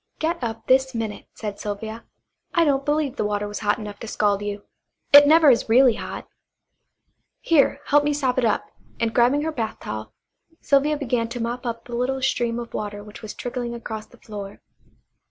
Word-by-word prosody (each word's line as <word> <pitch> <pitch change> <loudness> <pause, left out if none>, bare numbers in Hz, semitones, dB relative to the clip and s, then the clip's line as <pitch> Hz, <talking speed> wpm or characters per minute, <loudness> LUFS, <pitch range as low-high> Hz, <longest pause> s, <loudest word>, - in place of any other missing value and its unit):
"Get 330 0 -1
up 225 -1 -4
this 265 0 +3
minute," 220 -2 -4
said 210 -2 -6
Sylvia. 220 +2 -5 0.5
"I 335 -1 +5
don't 275 -2 +2
believe 295 -2 0
the - - 0
water 205 0 -1
was 205 - -5
hot 205 -1 +1
enough 210 -2 -8
to 230 - -7
scald 205 -2 +1
you; 205 0 -4 0.5
it 285 0 +10
never 310 -1 +7
is 235 - +1
really 250 +1 +6
hot. - - -7 1.1
Here, 315 -4 +3
help 290 0 +4
me 295 - +1
sop 265 -3 0
it 245 - +2
up," 215 - 0 0.3
and 230 -1 0
grabbing 255 +5 +3
her 320 - -1
bath 225 -7 -4
towel 110 0 -6 0.5
Sylvia 295 +2 +2
began 245 -5 -1
to 240 +1 -6
mop 240 +2 -3
up 230 -1 -4
the 240 - -9
little 255 +2 0
stream 240 -3 0
of 235 -1 -6
water 205 -1 -4
which 210 0 -12
was 215 -2 -7
trickling 245 -1 -4
across 220 -2 -6
the 245 - -19
floor. 205 -3 -8
235 Hz, 190 wpm, -23 LUFS, 215-270 Hz, 1.1 s, it